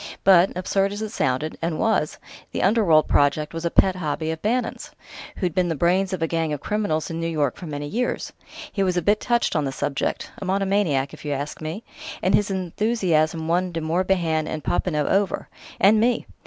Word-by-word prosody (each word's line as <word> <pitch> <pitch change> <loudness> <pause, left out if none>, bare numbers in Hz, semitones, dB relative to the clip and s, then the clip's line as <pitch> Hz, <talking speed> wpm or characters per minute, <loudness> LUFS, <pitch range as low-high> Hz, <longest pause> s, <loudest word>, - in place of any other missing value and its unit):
But, 185 -1 +6
absurd 195 +2 0
as 205 +1 -4
it 215 - -3
sounded 145 - -1
and 165 -1 -1
was 220 -9 +1 0.4
the - - -1
'Underworld' 190 -7 +4
project 145 +2 +2
was 165 +1 -4
a - - +2
pet 190 +2 +3
hobby 160 -1 -2
of 160 0 -6
Bannon's 230 +2 -1 0.5
who'd 180 -4 -1
been 180 0 +1
the 165 - -1
brains 180 +5 +2
of 185 -3 -2
a - - +1
gang 165 -1 -1
of 150 - -2
criminals 185 -5 -1
in 165 - -4
New 165 - -1
York 150 -5 0
for 175 - -9
many 145 -1 -4
years. 235 +12 -2 0.4
He 200 - -2
was 185 -2 +1
a 175 - 0
bit 205 +5 +3
touched 240 -1 +1
on 155 - +2
the 135 - -2
subject: 140 +1 -2
a - - -6
monomaniac, 190 -8 +1
if - - -11
you 145 -1 -2
ask 145 +3 -5
me. 160 +8 -5 0.4
And 185 - +2
his 205 +2 +3
enthusiasm 180 -4 0
won 180 +2 +1
De 165 - -3
Morbihan 165 -1 0
and 155 - -4
Popinot 150 -5 0
over... 195 0 0 0.3
and 210 +3 +5
me! 240 +2 +2
170 Hz, 205 wpm, -23 LUFS, 155-195 Hz, 0.5 s, But